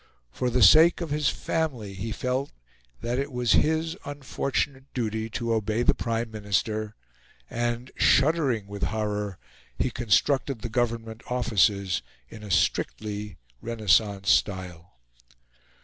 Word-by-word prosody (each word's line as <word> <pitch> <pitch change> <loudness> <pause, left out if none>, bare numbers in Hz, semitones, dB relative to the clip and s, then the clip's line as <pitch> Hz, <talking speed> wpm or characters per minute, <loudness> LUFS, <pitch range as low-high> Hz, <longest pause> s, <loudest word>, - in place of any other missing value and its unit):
For 125 - -1
the 120 -1 +3
sake 160 - +7
of 170 -4 -4
his 150 -1 +2
family 130 -12 -2
he 100 +4 -5
felt 130 +4 -2 0.5
that 120 +2 -1
it 140 +1 -3
was 125 -2 0
his 160 +1 +2
unfortunate 140 -1 -3
duty 110 -2 -2
to 115 +1 -2
obey 110 +1 0
the - - +4
Prime 115 0 -2
Minister; 105 0 -2 0.6
and, 120 +1 -2
shuddering 135 -7 +3
with 100 0 -8
horror, 105 0 -2 0.4
he 130 - 0
constructed 120 +2 +1
the 120 - -3
Government 115 -1 -2
offices 100 -6 +2 0.3
in 110 - -11
a 105 - -9
strictly 105 +2 -1 0.2
Renaissance 105 -3 +2
style. 90 -4 -1
115 Hz, 125 wpm, -26 LUFS, 105-130 Hz, 0.6 s, sake